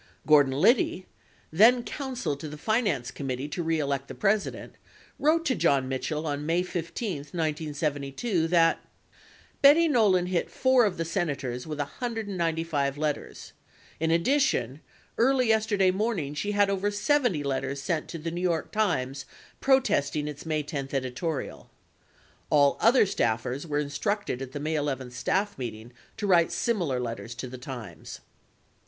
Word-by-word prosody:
48 - - -19
Gordon 145 -3 +5
Liddy, 185 - +3 0.5
then 230 +9 +5
counsel 260 - -3
to 140 +3 -7
the 150 - -8
Finance 195 - 0
Committee 135 0 -4
To 175 - -3
Re 165 -1 0
Elect 140 -2 -2
the - - -8
President, 210 0 -1 0.5
wrote 325 +3 +2
to 265 - +2
John 135 - +2
Mitchell 150 +4 -3
on 145 -1 -2
May 165 +3 +1
15, 175 +2 -4
1972, 155 - -2
that: 165 -1 +3 0.8
Betty 300 +4 +7
Nolan 210 - +3
hit 180 -1 -1
four 260 -2 +3
of 195 -4 -1
the 165 - -2
Senators 140 -7 -3
with 155 -1 -4
195 165 - -2
letters. 150 -1 -4 0.5
In 160 +1 0
addition, 170 - +1 0.4
early 255 0 +3
yesterday 215 -4 +3
morning 190 -7 -1
she 205 +8 -2
had 205 -1 +3
over 200 +1 0
70 205 - +1
letters 140 0 -2
sent 155 +2 -2
to 170 - -6
the 165 +1 -4
New 175 +1 -4
York 170 -3 -1
Times 140 -11 -1 0.3
protesting 150 - +2
its 150 +2 -7
May 155 -1 0
10 140 -2 -5
editorial. 135 +4 -3 0.8
(All 145 -2 +4
other 235 +1 +5
staffers 125 - -1
were 145 -1 -1
instructed 150 - -2
at 130 -1 -6
the 145 - -5
May 155 +2 -2
11 135 -4 -2
staff 195 +9 -1
meeting 120 -1 -6 0.2
to - - -3
write 175 -4 +4
similar 175 - 0
letters 115 -1 -5
to 125 +2 -6
the 125 0 -9
Times) 120 - -8
160 Hz, 150 wpm, -27 LUFS, 140-205 Hz, 0.8 s, Betty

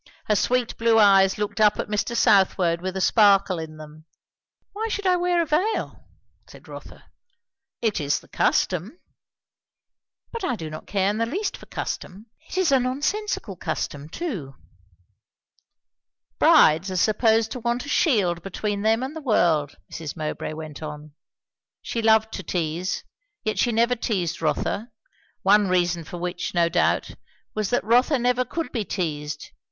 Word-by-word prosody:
Her 210 - +2
sweet 245 +3 0
blue 230 -1 +3
eyes 195 -2 +5
looked 210 +1 -2
up 210 -1 +5
at - - -3
Mr. 210 +3 -1
Southwode 185 -4 +3
with 185 +1 -4
a - - -2
sparkle 200 -3 +4
in 155 -1 -8
them. 155 0 -12 0.7
"Why 440 +2 -3
should 410 -2 -3
I 365 -1 +4
wear 350 -1 +1
a - - -4
veil?" 350 +9 -1 0.4
said - - -15
Rotha. - - -11 0.8
"It 215 -7 0
is 145 0 0
the - - -20
custom." 185 - 0 1.3
"But 465 -3 -6
I 365 - 0
do 160 -6 -7
not 155 - -9
care 195 0 +1
in 215 - -4
the 230 - +1
least 390 - -2
for - - -14
custom. 195 +4 -6 0.2
It's 370 -5 +1
a 270 - +5
nonsensical 275 - -2
custom, 145 -1 -4
too." 180 - -5 1.8
"Brides 160 +5 +5
are 185 - -4
supposed 220 +2 +2
to 250 - -4
want 240 +2 -2
a - - -8
shield 195 - +2
between 200 +2 -3
them 225 +3 +2
and 270 +4 -5
the 320 - -6
world," 165 - +2 0.2
Mrs. 160 -1 -6
Mowbray 155 0 -4
went 155 -1 -8
on. 150 -1 -8 0.7
She 230 - -3
loved 220 0 +3
to - - -4
tease, 175 0 -2 0.4
yet 215 - -2
she 240 - +2
never 235 +2 +2
teased 180 -9 -2
Rotha; 200 +8 -1 0.5
one 205 +1 +5
reason 175 -2 +1
for 175 - -8
which, 180 +1 -4
no 170 -1 +3
doubt, 175 0 +1 0.4
was 215 -2 -2
that 245 - +1
Rotha 245 +7 +3
never 250 +1 +1
could 325 +7 -5
be 230 -4 -2
teased. 150 -7 -4
205 Hz, 160 wpm, -24 LUFS, 170-245 Hz, 1.8 s, eyes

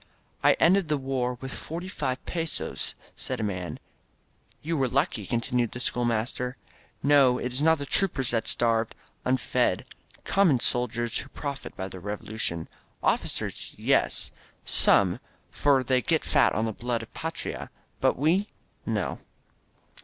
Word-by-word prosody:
"I - - +7
ended 185 +1 +4
the 150 -1 +1
war 130 -2 -1
with 130 -1 -6
forty 170 +3 -6
five 135 -7 -3
pesos," 165 -2 -3 0.2
said 130 -2 -4
a - - -1
man. 90 -4 -3 0.9
"You 165 +2 -1
were 135 -3 +2
lucky," 140 +7 0
continued 120 -1 0
the 125 - -5
schoolmaster. 120 +1 -1 0.5
"No, 140 -3 +5
it 125 0 -3
is 130 - 0
not 160 +1 +5
the 140 - -4
troopers, 140 -7 +2
the 115 -1 +2
starved, 115 -1 +2 0.3
unfed, 130 +1 +1 0.4
common 180 -10 +4
sol 120 +1 +3
diers 120 0 -2
who 135 - -8
profit 140 0 -6
by 95 - -3
the 95 -1 -9
Revolucion. 105 -3 -3 0.4
Officers, - - -1
yes - - +2 0.2
— - - -35 0.2
some - - +4 0.2
— - - -36
for 140 -2 +3
they 130 0 +2
get 160 +4 +1
fat 140 -5 +3
on 110 - +1
the 110 - -2
blood 120 +1 -2
of 115 - -14
the - - -9
Fatria. 165 +1 -4 0.3
But - - +2
we 170 +9 +2 0.2
— - - -32
^no." - - -1
130 Hz, 160 wpm, -27 LUFS, 115-145 Hz, 0.9 s, I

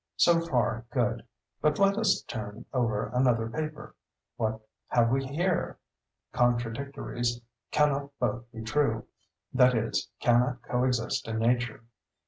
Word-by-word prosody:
So 170 -1 +5
far 120 -6 0
good—but 140 +4 -2
let 195 0 +4
us 220 -1 +2
turn 105 -2 -6
over 115 -5 0
another 125 -3 +2
paper. 155 +5 -5 0.4
What 110 -1 -1 0.3
have 115 -1 +3
we 135 +1 +2
here?—"Contradictories 120 -6 -2 0.3
cannot 140 -1 +2
both 120 0 -2
be 115 -2 -7
true—that 125 +1 0
is, 115 0 -1
cannot 120 0 +2
co 125 +1 0
exist 120 -2 0
in 110 0 -2
nature." 120 0 0
120 Hz, 110 wpm, -29 LUFS, 115-140 Hz, 0.4 s, So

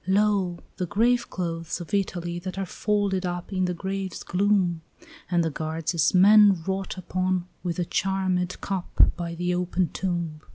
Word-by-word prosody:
"Lo, 195 -2 +2 0.2
the 180 - -2
graveclothes 195 -7 0
of 175 +3 -9
Italy 175 -3 -1
that 185 +2 -6
are 195 - -1
folded 200 0 0
up 175 +1 -4
In 185 -1 +1
the 180 - -1
grave's 190 +1 -4
gloom! 185 -3 +1 0.5
And 175 -2 +2
the 160 - -1
guards 160 +2 -3
as 165 +2 +2
men 200 -2 +7
wrought 195 0 -3
upon 185 0 -1
with 175 -3 -3
a 175 - 0
charmèd 185 -1 0
cup, 190 -3 +2
By 170 -1 -4
the 180 +1 -1
open 180 -1 0
tomb. 170 -4 -3
185 Hz, 160 wpm, -26 LUFS, 175-195 Hz, 0.5 s, men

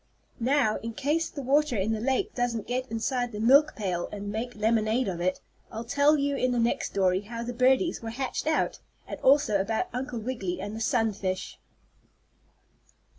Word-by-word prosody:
Now, 245 -2 +2
in 230 0 -6
case 305 +8 0
the 280 - -7
water 280 -1 +2
in 200 +3 0
the 220 - -1
lake 270 - 0
doesn't 240 -3 -1
get 255 +1 -3
inside 245 +2 -1
the 210 - -6
milk 280 +7 +5
pail 180 -5 -2
and 205 0 -5
make 235 +4 -4
lemonade 220 +2 +1
of 175 -3 -3
it, 185 +1 0 0.3
I'll 225 - -5
tell 285 +5 +3
you 280 0 0
in 255 -2 +1
the 245 - 0
next 235 +1 +1
story 185 -1 +1
how 230 +3 -6
the 245 +1 -4
birdies 260 +8 +2
were 225 - -5
hatched 260 +5 -3
out, 315 - +1 0.3
and - - -6
also 260 -7 +4
about 225 - -1
Uncle 250 0 -4
Wiggily 215 -6 -3
and 205 +3 -5
the 225 - -6
sunfish. 200 -5 -1
235 Hz, 180 wpm, -27 LUFS, 215-265 Hz, 0.3 s, milk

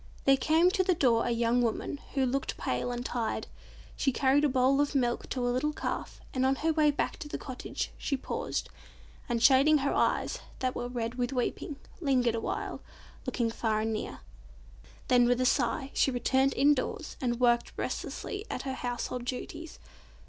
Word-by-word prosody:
There 275 - +7
came 320 +6 +3
to 375 - +2
the 365 -1 +2
door 235 -7 +3
a - - +1
young 235 +1 +2
woman, 240 +4 -1 0.2
who 270 -1 +3
looked 270 +2 -1
pale 125 - -1
and 245 0 -4
tired. 235 -3 -2 0.5
She 270 - +1
carried 270 +3 +3
a 295 - +4
bowl 265 +2 +3
of 290 0 -1
milk 245 -3 0
to 250 -2 -1
a - - +2
little 300 +4 0
calf, - - -4
and 255 - 0
on 265 +1 +3
her 320 +3 0
way 305 -1 +4
back 290 - -1
to 320 - -7
the - - -4
cottage 255 -2 -5
she 275 - -1
paused, - - -3 0.6
and 235 -1 0
shading 275 +4 +6
her 280 0 0
eyes, - - +1 0.2
that 255 -1 -1
were 245 - -3
red 240 0 -4
with 245 +1 0
weeping, 255 +3 -2 0.2
lingered 255 -7 +2
awhile, 230 - -3 0.5
looking 235 -3 0
far 220 -2 0
and 220 0 -1
near. 215 - -5 0.9
Then, 245 -1 +5
with 245 0 +2
a 255 - +2
sigh, 270 +2 +1
she - - +3
returned 265 +2 +2
indoors 285 +2 +1
and 240 -2 0
worked 240 -1 +3
restlessly 405 0 -4
at - - -3
her 265 - -3
household 245 -1 -3
duties. 310 +6 -5
255 Hz, 185 wpm, -30 LUFS, 245-280 Hz, 0.9 s, There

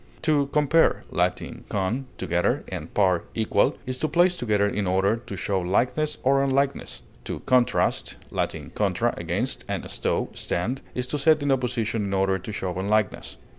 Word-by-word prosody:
To 150 -3 +3
compare 150 +3 +3
(L. - - +3 0.4
con, 105 +7 -1
together, 90 -1 0
and - - -6
par, 95 -4 +2
equal) 110 -2 +2
is 130 0 -4
to 155 - +1
place 175 +4 +3
together 105 -8 +1
in 100 -1 -1
order 95 +3 +2
to 115 -3 -8
show 95 0 -1
likeness 125 +11 0
or 135 +1 +4
unlikeness; 140 +1 -1 0.2
to - - -4
contrast 125 -1 +2 0.2
(L. - - +2 0.3
contra, - - +1
against, - - -2
and - - -3
sto, - - -1
stand) 120 +10 -2
is 125 - -1
to 145 +3 -3
set 155 +1 +4
in 145 - +1
opposition 115 -4 0
in 100 0 -1
order 95 0 +2
to 95 +4 -7
show 95 -3 -3
unlikeness. 105 +1 0
115 Hz, 165 wpm, -25 LUFS, 100-140 Hz, 0.4 s, or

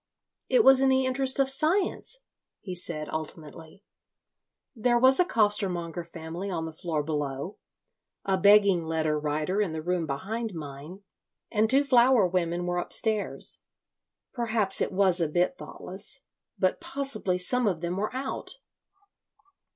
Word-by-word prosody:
"It - - +4
was 265 0 +7
in 270 - +4
the 265 0 +2
interest 260 +1 +2
of 275 -1 +3
science," 345 - +2 0.4
he 185 - -7
said, 155 -3 -2
ultimately. 155 +3 -8 0.9
"There 240 +1 +2
was 260 +2 +5
a 360 - +5
costermonger 190 - 0
family 170 +3 -7
on 165 -3 -3
the 160 - -7
floor 160 -2 -3
below, 145 +2 -4 0.7
a 195 - +1
begging 200 -3 +5
letter 160 -1 -1
writer 150 +6 -1
in 185 -6 -1
the 160 - -4
room 175 -1 -1
behind 210 +9 -4
mine, 150 +5 -9 0.5
and 220 -1 +2
two 275 +3 +4
flower 250 -4 +4
women 175 -1 -1
were 175 0 -1
upstairs. 215 +3 0 0.7
Perhaps 225 -5 0
it - - 0
was 190 -2 +2
a 165 - +2
bit 175 - 0
thoughtless. - - -6 0.4
But 185 -1 0
possibly 265 -9 -2
some 240 +6 +1
of 175 -5 -1
them 175 +1 -3
were 210 +2 -2
out. 265 - -4
190 Hz, 145 wpm, -27 LUFS, 165-240 Hz, 0.9 s, was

